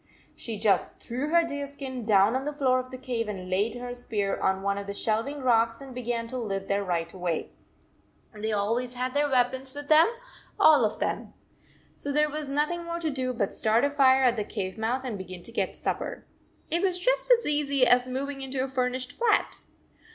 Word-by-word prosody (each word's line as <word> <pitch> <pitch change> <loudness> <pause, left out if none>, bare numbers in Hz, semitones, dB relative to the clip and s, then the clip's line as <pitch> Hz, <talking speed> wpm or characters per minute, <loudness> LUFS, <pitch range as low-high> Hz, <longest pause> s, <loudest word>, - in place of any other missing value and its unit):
She 225 -3 -5
just 205 -1 +1
threw 255 +5 -3
her 340 +1 +4
deer 285 -3 -4
skin 265 -4 -6
down 205 +2 +5
on 260 - -1
the 295 +1 -3
floor 260 -3 +2
of 255 0 -6
the 255 - -7
cave 245 -3 -3
and 185 -3 -6
laid 205 +5 +1
her 245 0 -5
spear 210 -5 -2
on 190 0 0
one 200 0 0
of 200 - -7
the 200 - -5
shelving 230 +8 -1
rocks 230 -2 +3
and 270 -2 -10
began 240 -1 -2
to 255 +1 -3
live 195 -4 -3
there 200 0 0
right 170 -3 -2
away. 175 -3 -3 0.8
They 215 +1 -3
always 230 +5 -1
had 255 +1 -2
their 290 0 +2
weapons 260 +1 0
with 290 0 -7
them, 310 +1 +7 0.5
all 295 -7 +7
of 210 - -2
them. - - -3 0.6
So 285 - -4
there 300 +1 +2
was 300 -1 -4
noth 295 +3 +1
ing 345 0 -3
more 340 0 -4
to 320 -2 -1
do 260 -2 -1
but 230 -5 -2
start 225 +4 +2
a 285 - 0
fire 265 -2 +5
at 245 -2 +3
the 210 - 0
cave 195 -3 -4
mouth 235 +4 -1
and 230 -6 -4
begin 185 -1 -8
to - - -9
get 230 - -2
supper. - - -3 0.5
It 340 +2 +2
was 375 -2 +1
just - - +2
as 475 -1 +5
easy 280 -3 +2
as 250 0 +4
moving 275 +2 -4
into 265 -1 -2
a - - -2
furnished 255 -1 -1
flat. 465 -3 +1
255 Hz, 215 wpm, -27 LUFS, 215-280 Hz, 0.8 s, them